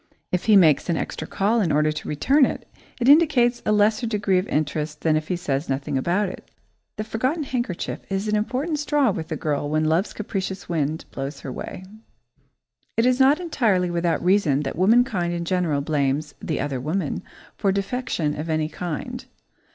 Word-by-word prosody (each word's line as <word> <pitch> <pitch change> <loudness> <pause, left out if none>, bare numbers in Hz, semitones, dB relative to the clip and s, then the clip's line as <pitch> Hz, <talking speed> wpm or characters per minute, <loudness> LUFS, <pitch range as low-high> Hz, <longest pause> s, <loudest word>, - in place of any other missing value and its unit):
If 180 - -1
he 215 - +6
makes 165 -4 +5
an 170 - +1
extra 160 - -4
call 220 +4 +1
in 170 -6 +1
order 150 +1 +3
to 150 - -6
return 270 - +3
it, - - -1 0.3
it 245 - 0
indicates 275 -5 +5
a - - +3
lesser 215 +3 +3
degree 205 -4 +1
of 185 - -4
interest 150 0 -2
than 160 -1 +2
if 155 0 -1
he 180 - 0
says 145 -4 -2
nothing 135 0 -2
about 175 +9 +1
it. 185 - -9 0.5
The 215 - -3
forgotten 255 +9 -1
handkerchief 240 -9 -3
is 195 +2 -1
an 210 - +1
important 260 +9 -1
straw 295 -4 +2
with 160 -4 -5
a - - 0
girl 145 -1 -2
when 155 +1 +1
love's 165 +6 +1
capricious 195 -2 -4
wind 160 -2 -1
blows 135 +1 -5
her 135 - -6
way. 180 - -7 1.1
It 230 - +3
is 255 +1 +3
not 275 +4 +5
entirely 215 - +1
without 170 0 0
reason 180 -7 +3
that 135 - -4
womankind 190 -2 +3
in 170 0 -3
general 170 -5 0
blames 145 0 -1
"the 155 - -2
other 135 -2 -2
woman" 155 +3 -2 0.3
for 195 - +1
defection 195 -6 -1
of 160 +2 -4
any 155 -1 0
kind. 170 -3 -5
180 Hz, 185 wpm, -23 LUFS, 155-220 Hz, 1.1 s, he